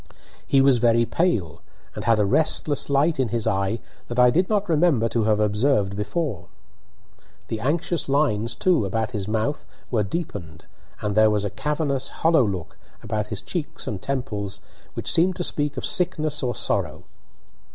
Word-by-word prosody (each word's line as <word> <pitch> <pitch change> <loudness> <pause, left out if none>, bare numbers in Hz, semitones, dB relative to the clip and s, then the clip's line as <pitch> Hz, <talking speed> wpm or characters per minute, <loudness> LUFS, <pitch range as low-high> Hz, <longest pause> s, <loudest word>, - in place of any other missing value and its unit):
He 135 - +4
was 135 -3 +4
very 115 0 +3
pale, 95 - -1 0.3
and - - -6
had 115 -1 +4
a 105 - +3
restless 145 +5 +2
light 140 +2 +2
in 130 - +2
his 115 -1 -1
eye 100 0 0 0.3
that 120 - -6
I 125 0 +6
did 180 +7 +1
not 205 -2 +1
remember 155 -8 +3
to 115 -2 0
have 105 -1 +2
observed 105 -1 +1
before. 105 - -3 1.0
The 110 - -3
anxious 160 +5 -1
lines, 135 -6 +1
too, 180 -9 +2
about 110 +4 -2
his 105 -5 -3
mouth 110 +7 -1 0.3
were 115 -4 +2
deepened, 100 - -5 0.4
and 105 -1 -1
there 110 +1 +5
was 105 -1 0
a 100 - -3
cavernous, 145 -2 -1
hollow 160 -4 +3
look 95 -6 -4 0.2
about 105 -1 -2
his 105 -2 -4
cheeks 165 -6 -4
and 100 -4 -4
temples 105 -7 -3 0.4
which - - -1
seemed 175 +2 +3
to 175 - -3
speak 145 -3 -1
of - - -3
sickness 155 -4 +1
or 125 -3 -1
sorrow. - - -1
120 Hz, 170 wpm, -23 LUFS, 105-150 Hz, 1.0 s, I